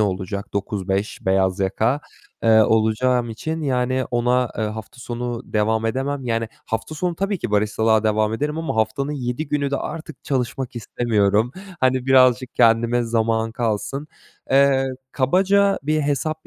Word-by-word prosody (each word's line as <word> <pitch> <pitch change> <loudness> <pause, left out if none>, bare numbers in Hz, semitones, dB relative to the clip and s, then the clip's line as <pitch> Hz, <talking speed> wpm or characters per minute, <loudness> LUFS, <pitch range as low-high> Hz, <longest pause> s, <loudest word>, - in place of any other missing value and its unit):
olacak. 100 0 -2
09.00-17.00 100 0 -2
beyaz 95 0 +2
yaka, 110 +8 +1 0.4
eee, 110 -1 +6
olacağım 115 +3 +2
için, 160 +8 -4
yani, 130 -1 0
ona, 125 0 +1
eee, 110 - +1
hafta 110 +3 -7
sonu 120 -1 -4
devam 110 +1 +1
edemem. 135 +3 -2
Yani, 115 -1 -1 0.2
hafta 110 +7 -3
sonu 175 +3 -1
tabii 195 +2 -1
ki 120 - -4
baristalığa 110 +1 +2
devam 110 0 +2
ederim 150 +6 -2
ama 165 -7 -3
haftanın 110 +7 0
7 130 +2 -3
günü 140 -1 0
de 140 - 0
artık 155 0 -7
çalışmak 130 -1 -2
istemiyorum. 110 -1 +1 0.3
Hani, 130 0 +2
birazcık 130 -1 +4
kendime 120 +1 +3
zaman 115 -1 0
kalsın. 120 +5 -2 0.4
Eee, 135 0 +4 0.2
kabaca 195 +8 +3
bir 155 +2 +1
hesap 150 +2 -2
120 Hz, 140 wpm, -22 LUFS, 110-135 Hz, 0.4 s, eee